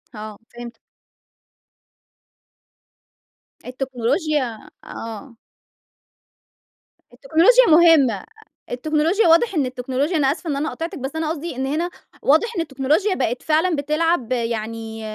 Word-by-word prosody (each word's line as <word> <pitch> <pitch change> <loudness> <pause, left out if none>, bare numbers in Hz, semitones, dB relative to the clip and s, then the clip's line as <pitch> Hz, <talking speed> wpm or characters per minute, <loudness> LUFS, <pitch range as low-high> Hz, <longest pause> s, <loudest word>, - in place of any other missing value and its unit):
آه 215 -1 -8
فهمتِك. 240 -1 -10 2.9
التكنولوجيا 255 - -2 0.2
آه. 230 +2 -9 1.8
التكنولوجيا 330 - +4
مهمة، 310 - +5 0.5
التكنولوجيا 310 - +1
واضح 335 +7 +4
إن 290 -4 +1
التكنولوجيا، 260 +6 -2
أنا 275 -2 +2
آسفة 335 +2 -6
إن 285 - -1
أنا 295 +3 -2
قاطعتِك، 330 +1 -6
بس 270 +3 -5
أنا 320 -1 -2
قصدي 325 -1 -5
إن 265 +1 -2
هنا 310 +6 -1 0.3
واضح 335 - +2
إن 345 - 0
التكنولوجيا 305 +7 0
بقِت 250 -4 -2
فعلًا 320 +3 +1
بتلعب 305 -3 0
يعني 225 -2 -3
285 Hz, 105 wpm, -21 LUFS, 245-325 Hz, 2.9 s, مهمة